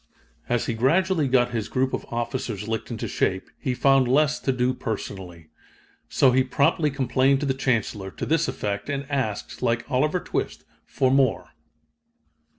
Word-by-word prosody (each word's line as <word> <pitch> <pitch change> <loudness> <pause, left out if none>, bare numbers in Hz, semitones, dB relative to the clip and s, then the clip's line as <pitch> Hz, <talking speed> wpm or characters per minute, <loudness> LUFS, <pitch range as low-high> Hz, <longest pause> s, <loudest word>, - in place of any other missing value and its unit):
As 120 -1 +1
he 115 - -1
gradually 160 +7 +2
got 125 -1 +2
his 110 -3 -3
group 130 0 0
of - - -3
officers 120 -3 -3
licked 110 0 -3
into 115 -3 -4
shape, 95 0 -1
he 130 -4 -2
found 135 -1 +4
less 150 +3 +2
to 135 - 0
do 125 0 +1
personally. 95 -8 -6 0.6
So 135 - +4
he 130 +1 +4
promptly 140 +4 +2
complained 135 0 +2
to - - -1
the 135 - +1
Chancellor, 110 -7 -1
to - - -6
this 165 +1 +1
effect, 105 +6 -3
and 140 0 -2
asked, 130 -7 -3
like 115 0 0
Oliver 150 +7 +1
Twist, - - -4 0.2
for 130 -2 +1
more. 135 -3 +2
130 Hz, 160 wpm, -24 LUFS, 115-140 Hz, 0.6 s, found